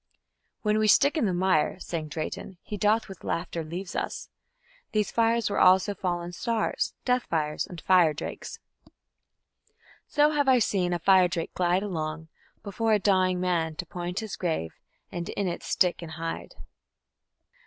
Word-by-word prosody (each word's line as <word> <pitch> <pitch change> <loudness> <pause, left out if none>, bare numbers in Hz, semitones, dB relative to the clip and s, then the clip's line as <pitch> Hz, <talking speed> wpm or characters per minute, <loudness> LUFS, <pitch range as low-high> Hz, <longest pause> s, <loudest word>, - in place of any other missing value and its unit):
"When 215 0 +2
we 215 - +2
stick 280 +8 +5
in 310 - +1
the - - +1
mire", 175 -4 +2
sang 165 -4 -4
Drayton, 155 +4 -5
"he 210 - -6
doth 210 +3 +2
with 195 -3 -11
laughter 170 -1 -3
leave 175 +4 -6
us." - - -4 0.6
These 210 -1 +1
fires 230 -1 +2
were 200 - -1
also 190 +2 +5
"fallen 175 -2 -3
stars", 230 +4 -1
"death 250 -1 +1
fires", 150 -2 -1
and 175 - -9
"fire 175 -1 +4
drakes": 150 - -6 1.5
So 295 0 +3
have 290 -2 +1
I 260 -1 +6
seen 190 -6 +1
a 175 - +1
fire 185 +1 +5
drake 170 -1 -4
glide 180 +2 +1
along 160 -4 -4 0.3
Before 220 +2 0
a - - +5
dying 185 -2 +2
man, 170 -3 0
to 180 - -5
point 180 +4 -4
his 220 -3 -6
grave, 160 - -2 0.4
And 170 -1 -5
in 200 -2 -2
it 175 - -3
stick 180 -1 +1
and 165 -2 -7
hide. 165 0 -5
185 Hz, 165 wpm, -27 LUFS, 170-210 Hz, 1.5 s, I